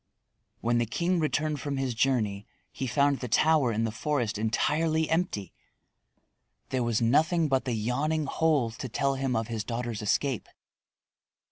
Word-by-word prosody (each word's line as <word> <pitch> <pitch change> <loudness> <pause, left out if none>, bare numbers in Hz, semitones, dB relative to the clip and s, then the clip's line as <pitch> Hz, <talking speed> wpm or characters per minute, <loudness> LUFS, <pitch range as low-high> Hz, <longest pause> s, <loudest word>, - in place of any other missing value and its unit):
When 120 +1 +2
the 120 - 0
king 170 - 0
returned 155 -2 0
from 145 -2 -3
his 135 -2 -1
journey 110 -5 0 0.2
he 130 - -4
found 140 +4 +2
the 125 - -4
tower 150 +1 +3
in 110 +1 0
the 115 - -1
forest 120 -3 -1
entirely 155 +8 +1
empty. 160 - -1 1.2
There 130 - 0
was 115 -1 +1
nothing 160 +7 +3
but 130 -3 +1
the 125 - -1
yawning 140 +8 0
hole 145 -5 +1
to 120 +3 -7
tell 140 +5 0
him 135 -2 -1
of 115 -1 -1
his 115 -3 -3
daughter's 115 -1 -4
escape. 115 +4 0
130 Hz, 155 wpm, -28 LUFS, 115-150 Hz, 1.2 s, tower